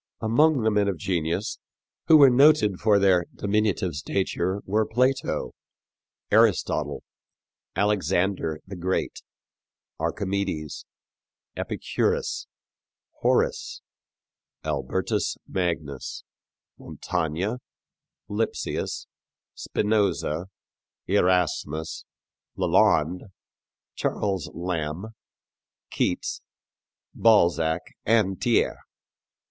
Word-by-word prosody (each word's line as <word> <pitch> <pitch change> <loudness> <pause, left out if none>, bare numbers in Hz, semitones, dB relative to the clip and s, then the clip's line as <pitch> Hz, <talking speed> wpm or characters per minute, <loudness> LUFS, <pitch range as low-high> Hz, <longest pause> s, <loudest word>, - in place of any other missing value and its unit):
Among 135 +4 +3
the 110 - +3
men 105 -1 +2
of 95 -3 -1
genius 85 +3 -2 0.5
who 160 - +8
were 140 -3 +8
noted 125 -7 +5
for 105 -2 +4
their 95 -3 +4
diminutive 100 -3 0
stature 95 +5 -1
were 105 +3 +2
Plato, 130 +4 0 0.8
Aristotle, - - +2 0.7
Alexander 95 -5 0
the 95 - -8
Great, 95 +1 -2 0.8
Archimedes, 95 -6 -3 0.7
Epicurus, - - -1 0.7
Horace, - - 0 0.8
Albertus 75 -3 -1
Magnus, 80 -7 -3 0.6
Montaigne, 90 +6 -2 0.7
Lipsius, 105 +2 -2 0.5
Spinoza, 95 -6 0 0.6
Erasmus, 90 -5 0 0.5
Lalande, 85 +6 +3 0.7
Charles 95 -6 -2
Lamb, 85 +2 -3 0.8
Keats, - - -1 0.7
Balzac 85 -7 +3 0.2
and 105 -4 +2
Thiers. 120 -3 +2
95 Hz, 70 wpm, -25 LUFS, 85-105 Hz, 0.8 s, who